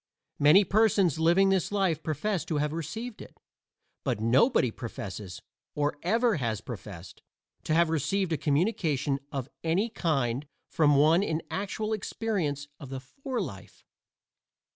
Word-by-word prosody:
Many 150 Hz, +8 st, +7 dB
persons 200 Hz, -5 st, +3 dB
living 175 Hz, +4 st, +4 dB
this 185 Hz, -1 st, +1 dB
life 190 Hz, -6 st, +1 dB
profess 165 Hz, +3 st, -1 dB
to 160 Hz, -3 st, -2 dB
have 150 Hz, +1 st, 0 dB
received 215 Hz, +9 st, -5 dB
it. -, -, -13 dB, 0.6 s
But -, -, -1 dB
nobody 125 Hz, -, +3 dB
professes, 100 Hz, -5 st, -7 dB, 0.3 s
or 145 Hz, 0 st, -1 dB
ever 225 Hz, +3 st, +2 dB
has 115 Hz, -6 st, -1 dB
professed, 100 Hz, -6 st, -9 dB, 0.4 s
to 155 Hz, -, +1 dB
have 170 Hz, -1 st, +3 dB
received 175 Hz, +3 st, 0 dB
a -, -, +1 dB
communication 145 Hz, -, 0 dB
of 135 Hz, -3 st, -3 dB, 0.2 s
any 180 Hz, +8 st, +1 dB
kind 140 Hz, -, -1 dB, 0.2 s
from 150 Hz, -2 st, +4 dB
one 155 Hz, +5 st, +5 dB
in 160 Hz, -5 st, -1 dB
actual 210 Hz, +2 st, -2 dB
experience 185 Hz, -9 st, -2 dB
of 140 Hz, -5 st, -9 dB
the 135 Hz, 0 st, -5 dB
fore 255 Hz, -, -5 dB
life. 110 Hz, -, -8 dB
160 Hz, 140 wpm, -28 LUFS, 140-195 Hz, 0.6 s, Many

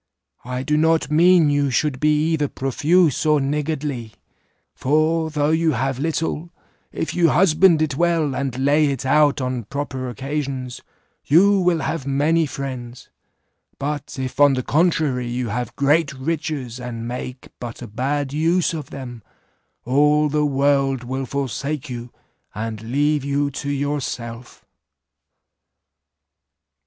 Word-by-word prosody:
I 125 Hz, +1 st, -3 dB
do 150 Hz, +3 st, +1 dB
not 160 Hz, 0 st, +2 dB
mean 165 Hz, -1 st, +5 dB
you 145 Hz, -1 st, +1 dB
should 135 Hz, +1 st, 0 dB
be 150 Hz, +1 st, +2 dB
either 150 Hz, -3 st, +1 dB
profuse 150 Hz, +5 st, +1 dB
or 150 Hz, -1 st, +3 dB
niggardly; 140 Hz, -4 st, -2 dB, 0.6 s
for 160 Hz, +3 st, +1 dB
though 150 Hz, -1 st, 0 dB
you 160 Hz, -1 st, +2 dB
have 130 Hz, +1 st, -1 dB
little, 160 Hz, +2 st, -2 dB, 0.4 s
if -, -, -3 dB
you 170 Hz, -2 st, +3 dB
husband 170 Hz, -2 st, +4 dB
it 145 Hz, -3 st, -2 dB
well, 165 Hz, -3 st, +1 dB
and 135 Hz, -2 st, -3 dB
lay 145 Hz, +3 st, +3 dB
it 135 Hz, -2 st, -3 dB
out 145 Hz, 0 st, +3 dB
on 125 Hz, -3 st, -3 dB
proper 130 Hz, 0 st, -4 dB
occasions, 135 Hz, 0 st, -4 dB, 0.4 s
you 195 Hz, +7 st, +5 dB
will 180 Hz, -3 st, +2 dB
have 150 Hz, -5 st, -3 dB
many 155 Hz, +4 st, +2 dB
friends; 130 Hz, -3 st, -7 dB, 0.7 s
but 145 Hz, 0 st, -4 dB
if 130 Hz, 0 st, -5 dB
on 145 Hz, -2 st, +6 dB
the 130 Hz, -, -2 dB
contrary 150 Hz, -6 st, +1 dB
you 120 Hz, 0 st, -3 dB
have 120 Hz, +2 st, -4 dB
great 145 Hz, +2 st, +2 dB
riches, 140 Hz, -3 st, -3 dB
and 120 Hz, -2 st, -6 dB
make 125 Hz, +1 st, -6 dB
but 120 Hz, 0 st, -7 dB
a -, -, -7 dB
bad 135 Hz, +5 st, -2 dB
use 170 Hz, +4 st, +1 dB
of 155 Hz, -4 st, -6 dB
them, 125 Hz, -4 st, -8 dB, 0.6 s
all 150 Hz, +4 st, +3 dB
the 150 Hz, 0 st, +1 dB
world 135 Hz, -2 st, +1 dB
will 130 Hz, +2 st, -4 dB
forsake 140 Hz, +2 st, -3 dB
you, 120 Hz, 0 st, -7 dB, 0.4 s
and 110 Hz, 0 st, -4 dB
leave 145 Hz, +5 st, 0 dB
you 140 Hz, 0 st, 0 dB
to 140 Hz, +1 st, -5 dB
yourself. 130 Hz, -4 st, -4 dB
140 Hz, 135 wpm, -21 LUFS, 130-155 Hz, 0.7 s, on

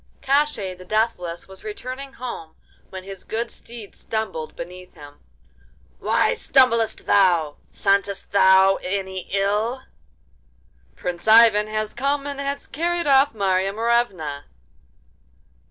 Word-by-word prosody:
Koshchei 270 Hz, -9 st, +1 dB
the 185 Hz, -, -13 dB
Deathless 180 Hz, -4 st, -2 dB
was 190 Hz, 0 st, -13 dB
returning 255 Hz, +5 st, -7 dB
home 235 Hz, -11 st, -7 dB, 0.3 s
when 190 Hz, -1 st, -8 dB
his 195 Hz, -1 st, -9 dB
good 230 Hz, +1 st, -4 dB
steed 230 Hz, -3 st, -12 dB
stumbled 220 Hz, -8 st, -4 dB
beneath 180 Hz, +1 st, -10 dB
him. 145 Hz, -1 st, -14 dB, 0.8 s
'Why -, -, +2 dB
stumblest 230 Hz, -4 st, +2 dB
thou? 175 Hz, -7 st, +3 dB
Scentest 200 Hz, 0 st, 0 dB
thou 190 Hz, -1 st, +5 dB
any 190 Hz, -1 st, -3 dB
ill?' 210 Hz, +6 st, 0 dB, 1.1 s
'Prince 175 Hz, +2 st, -5 dB
Ivan 220 Hz, -1 st, +6 dB
has 215 Hz, 0 st, -3 dB
come 280 Hz, +2 st, -1 dB
and 285 Hz, -1 st, -5 dB
has 280 Hz, 0 st, -3 dB
carried 340 Hz, +3 st, -2 dB
off 275 Hz, -2 st, +4 dB
Marya 195 Hz, -1 st, +1 dB
Morevna. 205 Hz, -11 st, -1 dB
210 Hz, 115 wpm, -22 LUFS, 185-240 Hz, 1.1 s, Ivan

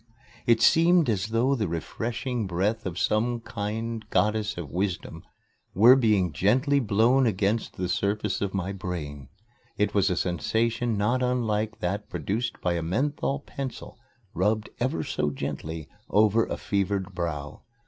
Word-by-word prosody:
It 115 Hz, -1 st, +4 dB
seemed 165 Hz, -4 st, +5 dB
as 100 Hz, -2 st, -1 dB
though 115 Hz, +5 st, +2 dB
the 110 Hz, -7 st, 0 dB
refreshing 115 Hz, -, -3 dB
breath 100 Hz, +5 st, -1 dB
of 85 Hz, -1 st, -5 dB
some 115 Hz, +5 st, +1 dB
kind 115 Hz, +1 st, -4 dB
Goddess 105 Hz, -2 st, +1 dB
of 80 Hz, -6 st, -6 dB
Wisdom 95 Hz, +1 st, -3 dB, 0.5 s
were 115 Hz, +7 st, +8 dB
being 105 Hz, -, +2 dB
gently 130 Hz, -, +3 dB
blown 120 Hz, +3 st, +3 dB
against 105 Hz, +2 st, 0 dB
the 90 Hz, -, -1 dB
surface 100 Hz, +2 st, -1 dB
of 100 Hz, -1 st, -1 dB
my 95 Hz, -1 st, -2 dB
brain. 75 Hz, -8 st, -6 dB, 0.5 s
It 105 Hz, -, +1 dB
was 100 Hz, -1 st, +3 dB
a 90 Hz, -, +1 dB
sensation 115 Hz, +7 st, 0 dB
not 120 Hz, +5 st, +1 dB
unlike 115 Hz, -3 st, -1 dB
that 100 Hz, +4 st, -2 dB
produced 115 Hz, +4 st, -3 dB
by 90 Hz, -, +1 dB
a 85 Hz, -, -1 dB
menthol 135 Hz, -, -1 dB
pencil 135 Hz, -3 st, -7 dB, 0.3 s
rubbed 105 Hz, +4 st, 0 dB
ever 120 Hz, -10 st, 0 dB
so 75 Hz, -, -1 dB
gently 80 Hz, +3 st, -5 dB, 0.2 s
over 110 Hz, +2 st, +3 dB
a -, -, -3 dB
fevered 100 Hz, -1 st, -1 dB
brow. 75 Hz, -5 st, -4 dB
105 Hz, 145 wpm, -26 LUFS, 95-115 Hz, 0.5 s, were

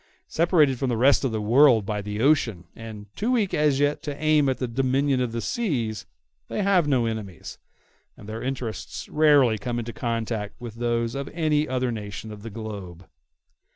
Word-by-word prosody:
Separated 155 Hz, -6 st, +3 dB
from 135 Hz, -, 0 dB
the 120 Hz, -, 0 dB
rest 135 Hz, +5 st, +4 dB
of 135 Hz, -, 0 dB
the 110 Hz, -, -2 dB
world 115 Hz, 0 st, +5 dB
by 105 Hz, 0 st, -2 dB
the 105 Hz, +1 st, -4 dB
ocean, 120 Hz, -, +2 dB
and 110 Hz, -2 st, -9 dB
too 225 Hz, +4 st, -1 dB
weak 215 Hz, -6 st, +1 dB
as 150 Hz, -2 st, +2 dB
yet 145 Hz, +1 st, +1 dB
to 145 Hz, -1 st, -5 dB
aim 155 Hz, -2 st, +3 dB
at 130 Hz, -, 0 dB
the 125 Hz, -, -2 dB
dominion 135 Hz, +2 st, +1 dB
of 125 Hz, -2 st, -1 dB
the 115 Hz, 0 st, -3 dB
seas, 120 Hz, -, -2 dB, 0.4 s
they 210 Hz, -, -2 dB
have 185 Hz, -5 st, +3 dB
no 130 Hz, -5 st, +2 dB
enemies, 110 Hz, -5 st, -6 dB, 0.6 s
and 100 Hz, -, -12 dB
their 110 Hz, +1 st, -5 dB
interests 125 Hz, -4 st, -5 dB
rarely 145 Hz, -8 st, +4 dB
come 120 Hz, +2 st, -3 dB
into 120 Hz, 0 st, -4 dB
contact 115 Hz, -3 st, -3 dB
with 120 Hz, -2 st, -7 dB
those 115 Hz, 0 st, -1 dB
of 140 Hz, 0 st, -4 dB
any 155 Hz, -2 st, +1 dB
other 130 Hz, -1 st, -1 dB
nation 110 Hz, 0 st, -6 dB
of 105 Hz, -1 st, -9 dB
the 115 Hz, -, -7 dB
globe. 100 Hz, -5 st, -8 dB
120 Hz, 190 wpm, -25 LUFS, 110-145 Hz, 0.6 s, world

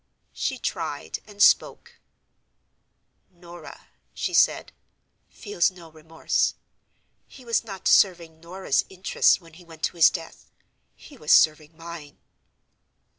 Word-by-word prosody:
She -, -, -3 dB
tried, 80 Hz, -, -5 dB
and 205 Hz, -1 st, 0 dB
spoke: -, -, +2 dB, 1.3 s
"Norah," 175 Hz, -2 st, -14 dB, 0.3 s
she -, -, -4 dB
said, -, -, +2 dB, 0.6 s
"feels 205 Hz, -5 st, -1 dB
no 175 Hz, -3 st, -15 dB
remorse. 160 Hz, +1 st, -2 dB, 0.7 s
He 260 Hz, -, -16 dB
was 230 Hz, -1 st, 0 dB
not 195 Hz, -4 st, -7 dB
serving 170 Hz, -4 st, +2 dB
Norah's 175 Hz, -2 st, -2 dB
interests 190 Hz, -1 st, +1 dB
when 165 Hz, -3 st, -19 dB
he 175 Hz, +3 st, -16 dB
went 165 Hz, -2 st, -16 dB
to -, -, -2 dB
his 165 Hz, -, +7 dB
death: 165 Hz, -3 st, -9 dB, 0.5 s
he 285 Hz, -, -16 dB
was 150 Hz, -, -3 dB
serving 155 Hz, 0 st, +3 dB
mine." 165 Hz, -3 st, -10 dB
170 Hz, 120 wpm, -24 LUFS, 160-190 Hz, 1.3 s, his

